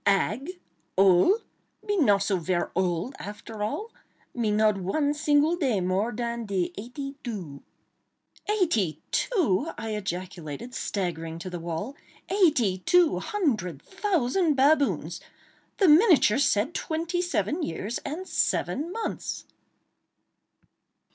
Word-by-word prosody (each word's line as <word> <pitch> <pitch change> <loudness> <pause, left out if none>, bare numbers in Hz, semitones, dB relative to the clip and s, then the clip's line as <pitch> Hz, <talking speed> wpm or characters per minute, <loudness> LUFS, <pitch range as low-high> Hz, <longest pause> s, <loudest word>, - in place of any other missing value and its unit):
"Ag?—ole?—me 255 - 0
not 205 - +4
so 195 -1 +1
ver 175 0 -1
ole, 180 +6 0
after 210 +1 -8
all! 415 - -3 0.4
Me 235 -3 0
not 215 0 +3
one 285 +11 0
single 295 +2 +3
day 265 - +1
more 185 +5 0
dan 235 +1 -3
de 185 -3 -1
eighty 275 +6 -7
doo." 180 - -6 0.9
"Eighty 325 - +1
two!" 325 - +1
I 225 - -4
ejaculated, 185 - -5
staggering 165 -7 -3
to 180 +2 -7
the 175 - -4
wall—"eighty 240 - 0
two 350 - +3
hundred 215 - -1
thousand 360 - +1
baboons! 280 +1 +2 0.6
The 390 - +4
miniature 310 - +6
said 255 +1 +2
twenty 335 +2 -2
seven 350 -1 -1
years 205 - -3
and 330 +7 -6
seven 310 +6 0
months!" 450 +3 -4
235 Hz, 110 wpm, -27 LUFS, -, 0.9 s, miniature